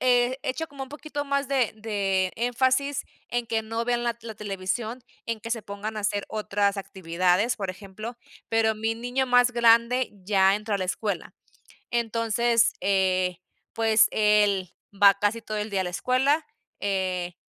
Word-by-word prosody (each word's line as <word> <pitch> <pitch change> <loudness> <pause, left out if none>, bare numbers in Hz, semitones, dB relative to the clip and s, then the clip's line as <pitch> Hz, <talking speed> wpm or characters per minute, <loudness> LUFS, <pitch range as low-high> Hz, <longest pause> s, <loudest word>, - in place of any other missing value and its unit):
eh, 250 +1 +3
hecho 320 +5 -2
como 280 -2 -8
un 265 - -7
poquito 295 0 -5
más 280 -1 -1
de 265 -5 +1
de 195 -4 0
énfasis 260 +3 +1 0.2
en 240 -1 -2
que 220 0 0
no 225 +1 -3
vean 240 0 0
la 235 -1 -1
la 225 -2 -7
televisión, 210 +4 -3 0.2
en 230 -2 -3
que 230 - -7
se 230 -2 -1
pongan 205 +2 -6
a - - -2
hacer 205 0 -1
otras 205 -1 0
actividades, 185 +3 0
por 195 -2 -3
ejemplo. 215 +5 -8 0.3
Pero 225 -1 +2
mi 225 +1 -1
niño 245 +3 -1
más 245 0 +4
grande 235 +2 +4
ya 195 -1 +4
entró 210 0 -2
a - - 0
la 185 - -1
escuela. 195 0 -3 0.6
Entonces, 230 0 +2
eh, 185 -2 +1 0.4
pues, 225 -1 +4
él 205 -4 +2 0.2
va 200 0 +7
casi 205 +3 -1
todo 215 -1 -4
el 210 +1 -3
día 195 -2 0
a - - -1
la - - -2
escuela, 270 - +1 0.4
eh, 185 -3 -1
220 Hz, 170 wpm, -26 LUFS, 200-245 Hz, 0.6 s, va